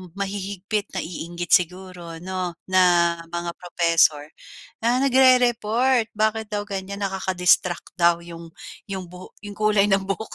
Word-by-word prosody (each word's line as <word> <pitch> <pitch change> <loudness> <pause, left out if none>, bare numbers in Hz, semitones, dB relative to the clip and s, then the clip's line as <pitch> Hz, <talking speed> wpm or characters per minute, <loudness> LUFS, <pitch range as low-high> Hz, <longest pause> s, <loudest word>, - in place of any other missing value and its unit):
mahihigpit, 200 +1 -4
naiinggit 175 +1 -5
siguro 180 -2 -1
'no, 185 -1 -4
na 175 -2 +4 0.2
mga 170 0 -3
professor, 165 -4 +2 0.6
ah, 245 +2 +3
nagre-report 250 -2 +3
bakit 220 +1 0
daw 205 0 -1
ganyan, 200 0 -5
nakaka-distract 185 -2 +1
daw 170 0 +4
yung 170 -1 -10 0.4
yung 190 -2 -5
buho 180 0 -12
yung 205 0 -8
kulay 210 -1 +3
ng 195 0 +3
buhok. 195 +3 -4
190 Hz, 120 wpm, -23 LUFS, 175-210 Hz, 0.6 s, na